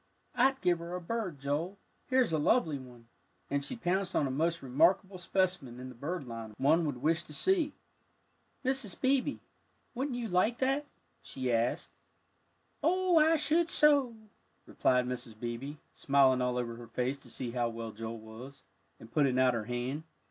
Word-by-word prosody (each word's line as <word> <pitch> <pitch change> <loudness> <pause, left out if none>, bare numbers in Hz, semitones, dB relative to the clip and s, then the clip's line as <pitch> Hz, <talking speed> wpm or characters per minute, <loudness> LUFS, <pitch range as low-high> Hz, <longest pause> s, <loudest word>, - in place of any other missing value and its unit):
"I'd 265 +2 +3
give 175 -1 +2
her 170 +1 -5
a - - -3
bird, 185 -3 -3
Joel, 145 +8 -2 0.3
here's 255 -8 +2
a 155 - +2
lovely 155 - +2
one," 120 -3 -14 0.4
and 140 0 0
she 150 - -4
pounced 190 -3 -1
on 145 - +3
a 135 - -2
most 165 +4 0
remarkable 180 +8 +2
specimen 180 -9 -1
in 130 0 -7
the - - -9
bird 145 +5 -4
line 115 -2 -7
one 160 +5 +3
would 130 -3 -4
wish 160 +2 +2
to 150 -3 -12
see. 340 - +1 0.9
"Mrs. 260 -7 -1
Beebe, 270 +1 +2 0.6
wouldn't 260 0 -2
you 235 -2 -3
like 210 +5 +2
that?" 270 +3 0 0.3
she 130 -2 -3
asked. 115 +1 0 0.9
"Oh, 360 +2 +3
I 320 +1 +5
should 320 +2 +2
so," 285 -7 +4 0.5
replied 125 0 +2
Mrs. 120 -3 -6
Beebe, 120 +5 -4 0.2
smiling 135 -2 +3
all 125 0 0
over 115 -1 -3
her 120 -1 -10
face 130 +4 -2
to - - -14
see 125 -3 -4
how 120 -1 0
well 115 -1 -6
Joel 115 +2 -6
was, 110 +5 -11 0.4
and 115 - -13
putting 140 -4 +2
out 130 -1 +4
her 115 -2 -2
hand. 125 +5 -3
150 Hz, 170 wpm, -31 LUFS, -, 0.9 s, I